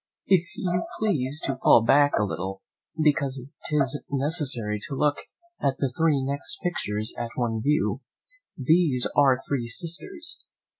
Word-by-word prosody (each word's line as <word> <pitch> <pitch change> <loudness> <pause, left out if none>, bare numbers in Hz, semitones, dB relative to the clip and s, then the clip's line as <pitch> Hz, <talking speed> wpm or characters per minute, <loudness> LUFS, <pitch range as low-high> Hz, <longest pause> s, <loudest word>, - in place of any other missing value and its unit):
"If 190 -3 +4 0.2
you 180 -6 -1
please 150 -10 0
to 135 -1 -2
fall 115 - +5
back 145 +4 +4
a - - +2
little, 95 -1 -4 0.4
because 140 -3 +1 0.3
'tis 145 -2 +1
necessary 135 -7 +2
to 140 - -4
look 145 +1 +1 0.4
at 135 -1 0
the 135 -3 -2
three 155 -4 +2
next 140 +1 -4
pictures 110 - -1
at 120 -1 -3
one 115 -3 -1
view; 150 +6 0 0.6
these 145 -2 +3
are 135 -3 +5
three 130 -5 -2
sisters. 190 - -5
140 Hz, 140 wpm, -25 LUFS, 125-160 Hz, 0.6 s, fall